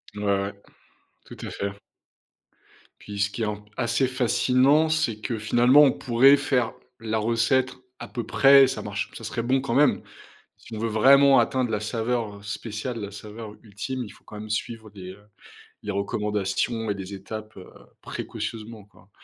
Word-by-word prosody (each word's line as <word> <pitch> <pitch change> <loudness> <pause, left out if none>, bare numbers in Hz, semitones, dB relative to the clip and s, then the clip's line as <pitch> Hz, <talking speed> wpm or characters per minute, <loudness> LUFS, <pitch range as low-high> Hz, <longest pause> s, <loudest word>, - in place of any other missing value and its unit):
Ouais, 105 - -6
ouais, 100 0 0 0.7
tout - - -12
à - - -5
fait. 100 0 -4 1.3
Puis 100 -1 -8
ce 105 +1 +2
qui 115 - -7
est - - +1
un 105 - -2
p 105 0 -20
assez 120 +2 +1
fascinant, 130 +4 +3
c'est 155 -9 0
que 115 +1 -3
finalement 120 +6 +5
on 140 -3 +6
pourrait 130 +4 +4
faire 130 -4 0 0.3
la 110 -1 -2
recette 115 +4 +1 0.3
à - - -7
peu 120 - -5
près, 135 -1 +6
ça - - -4
marche - - -4
ça - - -11
serait 115 - -3
bon 130 +2 +1
quand 130 -3 -3
même. 145 0 +4 0.6
Si 115 - -12
on 110 - -5
veut 115 +1 -1
vraiment 135 +5 +6
atteindre 130 -3 0
la 105 - -1
saveur, 115 -1 -2
heu, - - -16
spéciale, 105 +3 -5
la 100 -1 -5
saveur 105 +1 -9
ultime, 120 +4 -5
il 105 - -10
faut - - -18
quand 105 - -10
même 110 - -8
suivre 110 0 -4
les, 95 -2 -9
heu, 105 +2 -17 0.5
recommandations 105 +2 -2
et - - +1
les 100 0 -8
étapes, 110 +3 -8
heu, 90 - -11 0.3
précautionneusement, 110 -2 -6
quoi. 105 -1 -23
115 Hz, 180 wpm, -25 LUFS, 105-130 Hz, 1.3 s, on